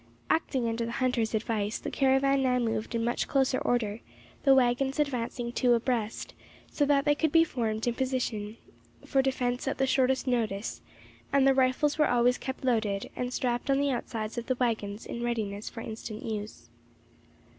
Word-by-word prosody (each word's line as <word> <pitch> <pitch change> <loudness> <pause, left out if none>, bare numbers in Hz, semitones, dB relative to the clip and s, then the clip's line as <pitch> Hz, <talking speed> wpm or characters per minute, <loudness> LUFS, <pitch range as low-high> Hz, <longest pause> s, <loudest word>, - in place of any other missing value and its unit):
Acting 265 -6 +1
under 230 +1 -1
the 230 0 -4
hunters' 245 -4 0
advice, 215 -1 -1
the - - -6
caravan 270 0 +3
now 255 -1 +2
moved 225 -1 -1
in 230 - 0
much 240 +1 -1
closer 265 -1 +2
order, 225 -3 0 0.4
the 270 -1 +5
waggons 265 +1 +2
advancing 245 -4 -1
two 245 0 +3
abreast, 230 -2 -2 0.4
so 290 - +1
that 280 0 +3
they 295 - +5
could 315 +1 0
be 330 +1 +6
formed 225 -7 -2
in 240 - +1
position 235 -4 -2 0.5
for 270 - +2
defence 255 -1 -1
at 270 - -1
the 270 - +2
shortest 260 0 +2
notice; 225 -5 -1 0.5
and 275 -1 +4
the 270 - +6
rifles 265 +3 +2
were 300 - +4
always 245 0 +3
kept 265 0 -5
loaded, 215 -5 0
and 250 0 -3
strapped 245 +1 -1
on 270 - +4
the 280 0 +1
outsides 230 -2 -3
of 235 - -9
the 255 - +1
waggons 220 -4 -2
in 235 - -5
readiness 215 -4 -2
for 230 - -8
instant 220 -1 -7
use. 205 - -6
245 Hz, 175 wpm, -29 LUFS, 225-265 Hz, 0.5 s, be